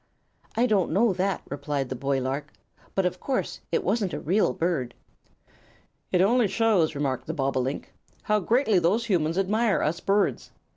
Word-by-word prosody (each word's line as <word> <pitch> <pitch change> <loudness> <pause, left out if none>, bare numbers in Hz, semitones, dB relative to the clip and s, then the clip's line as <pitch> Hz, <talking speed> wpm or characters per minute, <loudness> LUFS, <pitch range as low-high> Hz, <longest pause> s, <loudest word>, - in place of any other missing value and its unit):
"I 240 - +4
don't 205 -7 +2
know 205 +4 +3
that," 190 +2 -1
replied 140 -2 -3
the 130 - -3
boy 135 +1 -1
lark; 140 +3 -3 0.4
"but 195 - +1
of 180 - -1
course 265 -2 -2
it - - +1
wasn't 210 -6 0
a - - -4
real 195 +7 +2
bird." 165 -8 -2 1.2
"It 180 - +3
only 230 +3 +4
shows," 200 -8 +2
remarked 140 -3 -2
the 160 - -3
bobolink, 135 -1 -2 0.3
"how 210 0 +2
greatly 220 0 +2
those 195 +8 +1
humans 170 -6 0
admire 210 +3 +1
us 160 +3 0
birds. 200 +2 0
180 Hz, 160 wpm, -26 LUFS, 145-210 Hz, 1.2 s, I